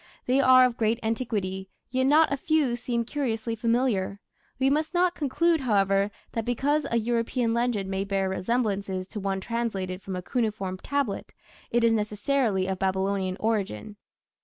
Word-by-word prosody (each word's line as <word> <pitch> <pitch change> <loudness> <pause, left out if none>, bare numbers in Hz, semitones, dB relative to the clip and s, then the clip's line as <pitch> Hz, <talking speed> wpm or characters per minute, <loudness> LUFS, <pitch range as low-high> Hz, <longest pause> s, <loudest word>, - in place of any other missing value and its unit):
They 255 +2 +2
are 255 -1 +7
of 245 -1 -1
great 225 +1 +1
antiquity, 205 -5 -2 0.2
yet 260 +1 +1
not 305 +1 +5
a - - 0
few 290 -4 +1
seem 240 -1 -2
curiously 230 -4 -2
familiar. 230 -4 0 0.4
We 265 0 +2
must 310 +5 0
not 355 0 +3
conclude, 325 +2 +1
however, 200 -4 +2 0.2
that 230 - -2
because 275 +6 0
a 235 - +1
European 230 +1 0
legend 235 -4 0
may 190 0 -1
bear 195 -1 0
resemblances 195 -1 -1
to 210 - -5
one 195 -1 -1
translated 195 -5 -3
from 190 -1 -5
a 180 - -5
cuneiform 205 -5 -2
tablet 280 -6 -2 0.3
it 235 0 +1
is 230 - +5
necessarily 210 -1 0
of 190 -1 -3
Babylonian 190 0 0
origin. 210 - -2
225 Hz, 160 wpm, -26 LUFS, 195-255 Hz, 0.4 s, are